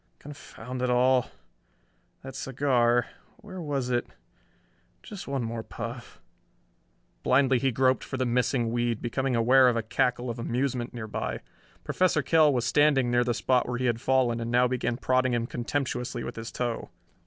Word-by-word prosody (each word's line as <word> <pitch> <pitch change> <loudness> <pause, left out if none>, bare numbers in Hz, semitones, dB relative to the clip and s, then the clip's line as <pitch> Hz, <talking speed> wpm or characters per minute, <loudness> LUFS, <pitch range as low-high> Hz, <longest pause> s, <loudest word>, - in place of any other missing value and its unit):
Confound 130 -3 -9
it 125 - 0
all... 125 +1 +3 0.9
that 135 0 -8
cigar... 120 -3 +1 0.3
where 185 -4 -9
was 140 -5 -2
it?... 120 0 0 1.0
Just 205 -3 -9
one 135 -3 -2
more 115 0 -4
puff.... 115 +2 -8 1.0
Blindly 130 -1 +3
he 135 0 +1
groped 130 +2 +2
for 130 - -5
the 130 - 0
missing 120 -1 0
weed, 120 -1 0
becoming 130 +2 -1
aware 125 +3 +5
of 120 - 0
a 115 - -1
cackle 120 +2 0
of 115 - -7
amusement 125 +1 -2
nearby. 110 -3 -4 0.4
Professor 175 -5 +1
Kell 155 -1 +4
was 125 -3 0
standing 145 -4 +3
near 120 0 +3
the 120 -1 -1
spot 125 -1 +1
where 125 - -2
he 130 - -2
had 120 -1 0
fallen 125 -3 +2
and 115 0 -4
now 125 +1 +3
began 125 -1 -2
prodding 130 -1 +1
him 115 -1 -1
contemptuously 125 0 -3
with - - -6
his 115 0 -7
toe. 120 -2 -3
125 Hz, 165 wpm, -27 LUFS, 120-130 Hz, 1.0 s, aware